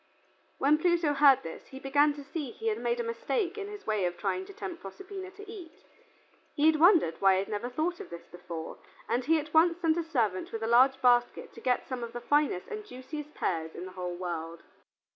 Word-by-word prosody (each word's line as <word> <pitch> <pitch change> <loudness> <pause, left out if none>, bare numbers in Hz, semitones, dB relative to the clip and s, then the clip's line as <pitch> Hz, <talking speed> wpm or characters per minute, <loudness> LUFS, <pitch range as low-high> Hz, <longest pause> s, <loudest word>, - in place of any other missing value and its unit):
When 295 +3 +3
Pluto 335 -3 +2
heard 280 -2 +6
this 165 - -8
he 265 - -10
began 285 +2 +3
to 290 - -8
see 280 0 -5
that - - -22
he 450 0 -1
had 435 - -2
made 475 0 -1
a - - 0
mistake 455 -4 -2
in 410 -2 -5
his 415 0 -9
way 215 -4 0
of 175 0 -2
trying 370 - -2
to - - -10
tempt 360 -4 -7
Proserpina 375 - -8
to 410 +1 -11
eat. 380 -7 -11 0.7
He 310 +1 +4
wondered 320 - +5
why 195 -1 +5
he 185 - +2
had 195 - -6
never 210 +3 -3
thought 320 +7 -2
of - - -8
this 170 0 -9
before, 170 -2 -8 0.3
and 245 - 0
he 325 +2 +4
at 300 0 -5
once 335 +1 +5
sent 330 -2 +1
a 340 - 0
servant 230 - -1
with 225 0 -4
a - - 0
large 260 +3 +5
basket 245 -1 +3
to - - -12
get 250 -1 0
some 255 -2 -4
of 235 0 -6
the 240 - -4
finest 290 -12 +1
and 430 0 -5
juiciest 300 -3 -8
pears 160 -2 -2
in 180 - -6
the 185 - -8
whole 180 -1 -5
world. 170 -2 -5
285 Hz, 230 wpm, -29 LUFS, 210-345 Hz, 0.7 s, heard